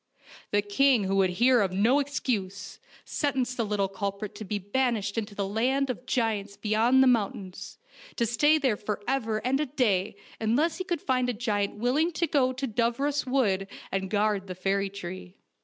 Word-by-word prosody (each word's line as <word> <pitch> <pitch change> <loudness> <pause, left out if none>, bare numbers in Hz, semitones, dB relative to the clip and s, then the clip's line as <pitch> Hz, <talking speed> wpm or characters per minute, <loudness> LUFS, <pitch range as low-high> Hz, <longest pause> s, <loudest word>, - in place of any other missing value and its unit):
The 205 0 +1
king, 245 +3 +3
who 195 +1 0
would 190 -1 +4
hear 240 +6 +4
of 195 -2 0
no 225 +9 +3
excuse, 200 -9 -3 0.3
sentenced 260 -4 -1
the 235 - 0
little 205 -2 0
culprit 200 +1 -4
to 220 - -8
be 210 +1 -2
banished 205 0 -1
into 215 -2 -4
the 200 -1 -2
land 255 +6 +1
of 250 +1 -9
giants 215 -5 -1
beyond 230 +5 +3
the - - +4
mountains, 200 -6 -1 0.4
to 235 - +1
stay 295 +7 +3
there 260 -8 +1
for 205 0 -4
ever 225 -5 -1
and 265 +2 +2
a 300 - 0
day 215 -7 0 0.2
unless 290 +10 +1
he - - -1
could 350 -4 -2
find 255 -1 +1
a - - 0
giant 210 -3 -1
willing 260 +10 +1
to 335 - +1
go 275 -4 +2
to 260 +2 -3
Dooros 250 +5 0
Wood 205 -8 +1 0.2
and 190 0 -2
guard 205 -1 0
the 185 - -6
fairy 195 +2 0
tree. 185 -1 -8
220 Hz, 185 wpm, -27 LUFS, 200-260 Hz, 0.4 s, would